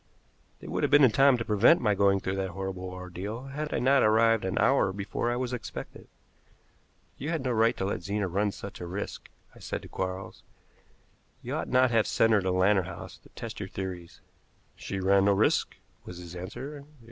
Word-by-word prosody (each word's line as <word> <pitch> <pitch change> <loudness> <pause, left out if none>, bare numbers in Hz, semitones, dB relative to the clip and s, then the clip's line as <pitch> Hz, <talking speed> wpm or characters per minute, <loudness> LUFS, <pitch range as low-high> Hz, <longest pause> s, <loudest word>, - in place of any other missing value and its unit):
They - - -10
would - - -2
have - - +2
been 145 0 +6
in 130 - +6
time 135 +3 +5
to 115 - -4
prevent 110 +10 +5
my 105 -4 +2
going 100 0 +3
through 95 +1 -3
that 95 -1 -2
horrible 95 0 -5
ordeal 90 +6 -6
had 150 +2 -4
I - - 0
not 130 +2 +4
arrived 110 -1 +4
an 95 - -2
hour 135 -8 +3
before 100 +4 -3
I 120 - 0
was 125 0 -3
expected. 120 -3 -7 1.1
"You 145 - -4
had 165 -5 -2
no 130 - 0
right 115 0 +2
to 95 - -2
let 100 - -2
Zena 100 +2 -2
ran 100 +3 0
such 100 -1 -9
a 90 - -5
risk," 95 +4 -6 0.2
I - - -16
said - - -5
to - - -9
Quarles. 95 +1 -5 1.0
"You - - -5
ought - - -3
not 130 0 +4
to - - -4
have 115 -2 +3
sent 115 0 +3
her 105 - +4
to 95 - -1
Lantern 95 +1 +3
House - - -9
to - - -20
test - - -7
your - - -5
theories." 90 -3 -7 0.5
"She 100 - -5
ran 95 +1 +3
no 100 - +4
risk," 95 - +1 0.3
was 90 - -9
his 90 0 -9
answer. 130 +11 -7
100 Hz, 210 wpm, -28 LUFS, 95-120 Hz, 1.1 s, been